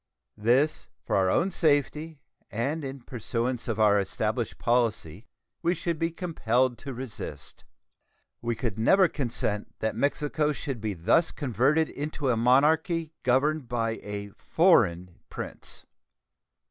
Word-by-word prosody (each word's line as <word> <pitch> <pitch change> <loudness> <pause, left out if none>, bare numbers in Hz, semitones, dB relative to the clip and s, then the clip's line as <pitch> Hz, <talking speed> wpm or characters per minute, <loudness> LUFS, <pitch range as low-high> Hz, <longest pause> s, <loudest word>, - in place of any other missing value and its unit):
This, 135 +9 +2 0.2
for - - 0
our 95 -1 +3
own 180 - +2
safety 155 -1 +1 0.3
and 140 +8 -2
in 135 -1 -6
pursuance 120 0 -3
of 110 -2 -2
our 105 -1 +5
established 110 +4 -2
policy, 115 -6 0 0.3
we 175 +2 +1
should 170 -3 -3
be 165 - +1
compelled 130 - 0
to 140 - -7
resist. 125 -3 -7 0.8
We 120 0 -1
could 115 -4 -3
never 185 - +5
consent 120 -8 -3
that 110 0 -2
Mexico 150 +1 0
should 135 -5 -5
be 105 -2 -2
thus 160 - +3
converted 140 +4 +1
into 145 -1 -3
a 125 - +3
monarchy 155 - +3
governed 135 +3 +1
by 115 -1 -1
a 100 0 -6
foreign 90 - +2
prince. - - -7
125 Hz, 130 wpm, -27 LUFS, 110-155 Hz, 0.8 s, our